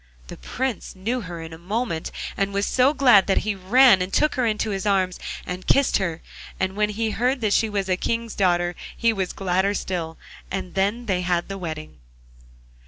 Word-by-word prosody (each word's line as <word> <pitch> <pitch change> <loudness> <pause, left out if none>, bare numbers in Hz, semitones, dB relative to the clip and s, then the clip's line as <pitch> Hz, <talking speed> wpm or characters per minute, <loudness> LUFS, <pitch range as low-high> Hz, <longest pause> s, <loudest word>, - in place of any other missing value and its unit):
The - - -8
Prince 245 - -4
knew 230 +7 -2
her 170 -4 -7
in 160 0 -9
a 160 - -10
moment, 185 -2 -3 0.2
and 195 0 0
was 200 0 +1
so 260 +2 +3
glad 250 -9 +5
that 195 - +2
he 215 - 0
ran 200 +2 +5
and 185 +1 -2
took 305 +7 +2
her 250 -2 +1
in 215 -1 0
his 210 -2 -2
arms 190 -3 +1 0.3
and 180 +1 -6
kissed 275 -1 +4
her, 170 -4 -3 0.4
and 190 0 -1
when 210 0 +1
he 220 +1 -1
heard 255 +5 0
that 210 -2 +1
she 220 - +2
was 200 -2 -2
a 185 -1 +1
King's 230 +2 -2
daughter 175 -2 +1 0.2
he 230 -1 +2
was 190 -3 -2
gladder 190 +1 0
still, 165 -4 -3 0.3
and 185 -2 -4
then 205 +5 0
they 185 -4 0
had 175 0 -1
the 195 - -4
wedding. 155 - -6
195 Hz, 200 wpm, -23 LUFS, 180-225 Hz, 0.4 s, glad